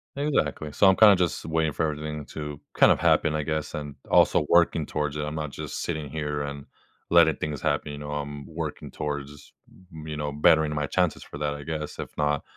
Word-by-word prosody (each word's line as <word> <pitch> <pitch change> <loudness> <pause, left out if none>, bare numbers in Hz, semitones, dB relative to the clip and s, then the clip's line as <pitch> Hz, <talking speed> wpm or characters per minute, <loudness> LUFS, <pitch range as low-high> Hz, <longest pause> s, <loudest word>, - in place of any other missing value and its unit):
Exactly. 80 - -1
So 95 - +4
I'm 95 - +6
kinda 105 -1 +8
just 90 -2 -1
waiting 80 -2 0
for - - -1
everything 75 -1 -3
to 75 -2 -6
kind - - +6
of - - +2
happen, 75 0 +3
I 75 - -1
guess, 80 0 -3
and 75 -2 -6
also - - +4
working 85 -2 +4
towards 75 -1 -2
it. 75 - -2
I'm 75 +1 -4
not 75 -2 -4
just - - -6
sitting 80 -4 -3
here 75 -1 -3
and 70 -1 -6 0.4
letting 80 -3 +5
things 75 -2 -4
happen, 75 -1 -1
you 75 - -7
know? 75 0 -6
I'm 75 -1 -5
working - - -5
towards, 75 -1 -6 0.4
you 80 -1 -7
know, 75 -1 -2
bettering 75 +1 +3
my 75 -1 -1
chances 90 0 0
for 70 - -10
that, 75 0 -1
I 75 0 -8
guess. 75 -1 -5
If - - -7
not, 75 -1 0
75 Hz, 210 wpm, -26 LUFS, 75-80 Hz, 0.4 s, kinda